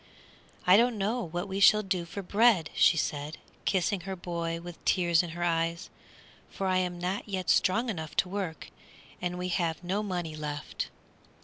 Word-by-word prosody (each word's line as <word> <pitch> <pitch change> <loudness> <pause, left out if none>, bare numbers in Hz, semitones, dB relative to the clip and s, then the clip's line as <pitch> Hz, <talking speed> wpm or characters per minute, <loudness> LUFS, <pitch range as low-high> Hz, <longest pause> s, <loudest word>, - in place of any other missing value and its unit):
"I 180 +2 +7
don't 235 0 +3
know 215 +5 0
what 175 0 -4
we 195 0 -3
shall 210 +2 +6
do 185 -3 -1
for 195 +4 -6
bread," 205 -4 +3
she 170 - +5
said, 150 0 -2 0.3
kissing 190 +1 +1
her 190 +2 -5
boy 170 -2 -3
with 175 0 -10
tears 170 -3 +3
in 175 - -6
her 175 - -2
eyes, 165 0 -1 0.6
"for 195 - -4
I 185 -1 +2
am 180 -1 -1
not 185 +4 -3
yet 185 -5 0
strong 225 +7 +3
enough 160 -8 -4
to - - +2
work, 180 -4 -5 0.5
and 180 0 -2
we 180 0 -3
have 170 -2 -1
no 190 +4 -1
money 175 -6 -3
left." 150 -1 -4
180 Hz, 180 wpm, -29 LUFS, 170-195 Hz, 0.6 s, I